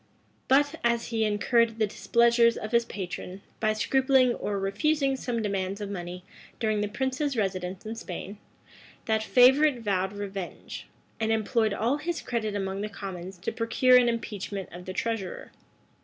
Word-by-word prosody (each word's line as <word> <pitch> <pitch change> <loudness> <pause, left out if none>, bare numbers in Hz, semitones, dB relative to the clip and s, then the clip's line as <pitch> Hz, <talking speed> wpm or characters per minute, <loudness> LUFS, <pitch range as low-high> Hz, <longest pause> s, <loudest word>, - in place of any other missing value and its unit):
But, 285 +4 +3
as 235 0 +1
he 225 -2 0
incurred 225 +2 +2
the 220 - +3
displeasure 235 +2 +3
of 215 - -6
his 235 -1 +3
patron, 185 -1 -6 0.2
by 215 -1 +2
scrupling 260 +2 +3
or 205 -3 -3
refusing 275 +8 +1
some 240 -3 -2
demands 195 -1 -2
of 205 -1 -5
money 180 -1 -6 0.4
during 215 -2 +1
the 210 - 0
prince's 265 +4 -2
residence 185 -2 -2
in 220 - -4
Spain, 200 -2 -7 0.7
that 220 -1 +1
favorite 260 +3 +5
vowed 190 -2 0
revenge, 200 -2 -6 0.3
and 220 0 0
employed 220 0 +1
all 240 +7 +1
his 335 +3 -3
credit 220 -3 -2
among 195 0 -2
the 210 - -3
commons 190 -2 -7
to 175 - -3
procure 245 +2 +3
an 245 -1 +6
impeachment 205 -4 -4
of 180 +1 -9
the 185 - -5
treasurer. 220 -4 -3
220 Hz, 155 wpm, -27 LUFS, 195-240 Hz, 0.7 s, an